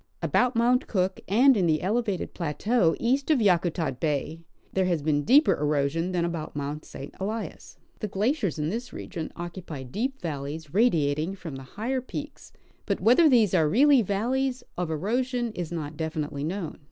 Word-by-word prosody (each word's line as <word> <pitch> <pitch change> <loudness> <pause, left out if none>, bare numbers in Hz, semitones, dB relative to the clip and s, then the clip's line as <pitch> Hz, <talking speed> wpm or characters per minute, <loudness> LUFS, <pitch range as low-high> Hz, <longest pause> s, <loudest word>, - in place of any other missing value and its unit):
About 250 0 +2
Mount 245 +2 +3
Cook, 190 -2 0
and 250 +7 +5
in 185 -5 +2
the 155 -1 +1
elevated 210 -1 -1
plateau 170 +3 +1
east 265 +5 +1
of 310 - +5
Yakutat 170 - +1
bay, 155 +1 -1 0.3
there 190 -1 +2
has 170 -5 0
been 150 -1 +2
deeper 280 - +5
erosion 150 +4 0
than 175 -2 0
about 165 -3 -4
Mount 145 +1 -4
St. 135 +1 -9
Elias. 215 +4 -5 0.2
The 215 - -2
glaciers 205 - 0
in 150 0 -1
this 235 +6 -4
region 165 -5 -6
occupy 170 -5 -7
deep 245 - -3
valleys 150 0 -5
radiating 165 -5 +2
from 170 -7 -8
the 135 - -7 0.2
higher 255 +5 -1
peaks; 290 +4 -8 0.4
but - - 0
whether 280 +8 +5
these 225 -8 +4
are 160 -4 +3
really 275 - +5
valleys 250 +6 -1
of 180 -2 -2
erosion 240 - -1
is 175 -6 -5
not 155 -3 -5
definitely 155 -3 -3
known. 170 +1 -4
185 Hz, 165 wpm, -26 LUFS, 155-240 Hz, 0.4 s, and